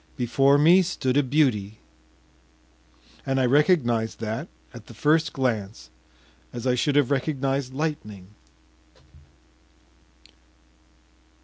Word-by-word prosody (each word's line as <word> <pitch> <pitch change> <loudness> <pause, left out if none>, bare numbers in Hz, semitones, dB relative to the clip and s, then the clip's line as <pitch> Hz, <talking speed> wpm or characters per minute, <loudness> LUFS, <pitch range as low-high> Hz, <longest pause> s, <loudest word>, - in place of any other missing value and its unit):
Before 135 +3 +2
me 170 +6 +5
stood 140 -8 -2
a 145 - +4
beauty, 125 -7 0 1.5
and 135 0 -1
I 130 - +2
recognized 125 -5 +1
that 110 0 -4 0.3
at - - -13
the - - -13
first 155 +1 +1
glance 110 - -3 0.6
as 120 0 -7
I 125 - +2
should 140 +3 0
have 145 -2 +2
recognized 135 -1 -2
lightning. 105 - -5
135 Hz, 100 wpm, -24 LUFS, 120-145 Hz, 1.5 s, me